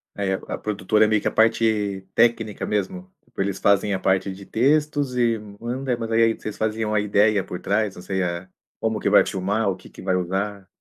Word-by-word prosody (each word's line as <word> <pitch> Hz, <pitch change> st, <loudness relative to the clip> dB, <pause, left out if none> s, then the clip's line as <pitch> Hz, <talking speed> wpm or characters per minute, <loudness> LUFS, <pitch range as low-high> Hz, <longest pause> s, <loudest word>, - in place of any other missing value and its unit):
Aí, 100 Hz, -1 st, -1 dB
a -, -, +2 dB, 0.2 s
a -, -, -9 dB
produtora 105 Hz, +1 st, +1 dB
é -, -, +2 dB
meio 110 Hz, -1 st, +2 dB
que -, -, -2 dB
a -, -, +1 dB
parte 110 Hz, -4 st, +1 dB
técnica 115 Hz, -3 st, +2 dB
mesmo, 185 Hz, -, -3 dB
tipo, -, -, -6 dB
eles 100 Hz, -1 st, -2 dB
fazem 100 Hz, 0 st, +3 dB
a 95 Hz, -, -1 dB
parte 95 Hz, +1 st, +1 dB
de 95 Hz, +1 st, -11 dB
textos 145 Hz, +2 st, +1 dB
e 115 Hz, -2 st, +2 dB, 0.2 s
manda, 125 Hz, +2 st, -2 dB
mas, 115 Hz, -1 st, -5 dB
aí, 115 Hz, 0 st, +4 dB
vocês 110 Hz, -1 st, -7 dB
fazem 110 Hz, 0 st, -1 dB
uma 105 Hz, -1 st, +1 dB
ideia 105 Hz, -1 st, +3 dB
por 90 Hz, -, -6 dB
trás, 100 Hz, 0 st, 0 dB
não -, -, -10 dB
sei 95 Hz, +1 st, -2 dB
a 85 Hz, +1 st, -4 dB, 0.3 s
como 110 Hz, -1 st, -1 dB
que -, -, 0 dB
vai 105 Hz, -, +6 dB
filmar, 100 Hz, +2 st, -1 dB
o 95 Hz, -, -1 dB
que 90 Hz, -, -15 dB
que -, -, -13 dB
vai 95 Hz, -1 st, 0 dB
usar. 95 Hz, +2 st, -2 dB
105 Hz, 220 wpm, -23 LUFS, 95-115 Hz, 0.3 s, vai